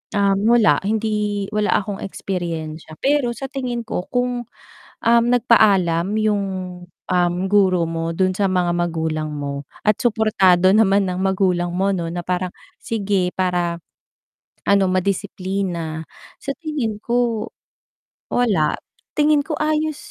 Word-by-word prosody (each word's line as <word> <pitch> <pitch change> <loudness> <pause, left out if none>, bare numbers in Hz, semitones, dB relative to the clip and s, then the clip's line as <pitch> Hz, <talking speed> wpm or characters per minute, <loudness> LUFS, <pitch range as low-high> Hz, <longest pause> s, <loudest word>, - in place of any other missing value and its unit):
um, 200 -1 +3
wala 220 -11 +5
hindi 210 -1 -1
wala 210 0 +1
akong 205 -1 -4
eksperyensya. 165 -5 -5
Pero 275 -3 +2
sa 270 - -5
tingin 250 -3 -3
ko 180 - -3
kung, 245 -1 -1 0.6
um, 235 0 +5
nagpaalam 200 -8 +3
yung, 210 -2 +1 0.7
um, 175 -1 +2
guro 185 -4 +3
mo 165 0 -2
dun 185 +1 +1
sa 200 - +1
mga 180 -2 +1
magulang 160 -3 -2
mo, 140 -1 -5 0.2
at 215 -1 +3
suportado 205 -6 +3
naman 200 -2 +4
ng 180 0 -2
magulang 185 -2 +1
mo 195 +2 +1
'no 170 -2 -3
na 175 - -3
parang 180 0 -1 0.3
sige 200 -4 -1
para, 175 -2 0 0.9
ano 200 -1 +5
madisiplina, 185 -3 -2 0.4
sa 275 - -4
tingin 270 -10 -3
ko, 235 -2 0 0.8
wala 200 -11 +2 0.4
tingin 300 0 +4
ko 305 +1 -4
ayos 310 0 0
195 Hz, 125 wpm, -21 LUFS, 175-225 Hz, 0.9 s, wala